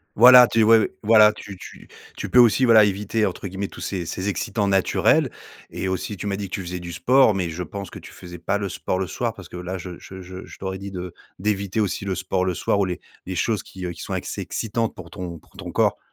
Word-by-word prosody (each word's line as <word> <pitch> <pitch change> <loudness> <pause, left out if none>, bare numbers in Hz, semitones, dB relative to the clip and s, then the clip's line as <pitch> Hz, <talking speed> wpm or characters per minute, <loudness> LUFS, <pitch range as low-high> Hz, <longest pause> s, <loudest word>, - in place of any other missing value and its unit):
Voilà, 125 +2 +9
tu 115 -1 +2
ouais, 110 0 +5
voilà, 105 0 +7
tu 100 -2 -10
tu - - -12 0.3
tu - - -4
peux 125 - +2
aussi, 120 +2 +6
voilà, 115 -3 +7
«éviter» 105 +2 0
entre 95 +1 -4
guillemets 95 +1 -4
tous - - -12
ces 90 -3 -3
ces 95 +4 -4
excitants 100 +2 -1
naturels 95 -1 +2 0.4
et 95 - -4
aussi, 95 +2 -3
tu 100 - -5
m'as 100 - -1
dit 100 -1 -5
que - - -3
tu - - -4
faisais 90 0 -5
du 85 0 -7
sport, 110 +8 +4
mais 90 -4 -2
je 85 +3 -4
pense 100 +4 -7
que - - -10
tu - - -12
faisais 85 -1 -10
pas 85 +4 -1
le 100 -1 -3
sport 95 0 -3
le 95 - -1
soir 120 +3 -2
parce 95 -5 -12
que, - - -12
là, 90 +1 -5
je 90 0 -7
je 95 0 -10
je 90 +1 -9
je - - -13
t'aurais 95 0 -5
dit 100 0 -7
de 90 -2 -6 0.3
d'éviter 100 0 -1
aussi 100 -2 -1
le 95 -1 -2
sport 95 0 -1
le 95 -1 0
soir 95 - 0
ou - - +3
les 90 -1 -4 0.3
les 95 - -5
choses 110 +2 0
qui, 95 -1 -8
heu, 90 - -3
qui - - -11
sont - - -5
excès - - -4
excitantes 115 0 -2
pour 85 -2 -10
ton 85 -2 -7
pour - - -27
ton - - -8
corps. - - +2
95 Hz, 260 wpm, -23 LUFS, 90-105 Hz, 0.4 s, Voilà